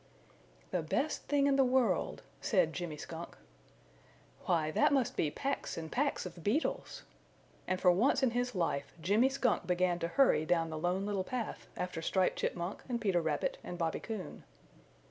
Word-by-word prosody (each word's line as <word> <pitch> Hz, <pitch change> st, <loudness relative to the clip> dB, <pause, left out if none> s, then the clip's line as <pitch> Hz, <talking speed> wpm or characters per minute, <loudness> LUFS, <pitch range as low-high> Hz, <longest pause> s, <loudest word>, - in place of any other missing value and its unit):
"The -, -, 0 dB
Best -, -, -1 dB
Thing 285 Hz, -1 st, +3 dB
in 275 Hz, -1 st, +3 dB
the 270 Hz, -, +6 dB
World," 255 Hz, -1 st, +1 dB, 0.2 s
said 185 Hz, -, +2 dB
Jimmy 170 Hz, -3 st, -4 dB
Skunk. 165 Hz, +2 st, -8 dB, 1.1 s
"Why, 155 Hz, -3 st, +2 dB
that -, -, +3 dB
must 270 Hz, -4 st, +1 dB
be 150 Hz, -, +1 dB
packs 275 Hz, -, -3 dB
and 160 Hz, -1 st, -5 dB
packs 285 Hz, -3 st, 0 dB
of 175 Hz, -2 st, -8 dB
beetles!" 255 Hz, +11 st, -1 dB, 0.6 s
And 185 Hz, -, 0 dB
for 180 Hz, -, +6 dB
once 260 Hz, +9 st, +3 dB
in 255 Hz, -, +4 dB
his 245 Hz, -1 st, -1 dB
life 165 Hz, -5 st, -1 dB
Jimmy 205 Hz, +10 st, +3 dB
Skunk 255 Hz, -9 st, 0 dB
began 180 Hz, -1 st, +2 dB
to 170 Hz, -, -1 dB
hurry 260 Hz, -, +4 dB
down 165 Hz, 0 st, +1 dB
the 155 Hz, -, -4 dB
Lone 180 Hz, +4 st, 0 dB
Little 200 Hz, -2 st, -1 dB
Path 235 Hz, +2 st, -4 dB
after 180 Hz, -2 st, -3 dB
Striped 185 Hz, +3 st, +1 dB
Chipmunk 175 Hz, +3 st, -2 dB
and 240 Hz, -1 st, -1 dB
Peter 195 Hz, -6 st, +2 dB
Rabbit 155 Hz, -3 st, -1 dB
and 175 Hz, -, -6 dB
Bobby 165 Hz, -1 st, -1 dB
Coon. 215 Hz, -4 st, -6 dB
185 Hz, 170 wpm, -33 LUFS, 170-245 Hz, 1.1 s, the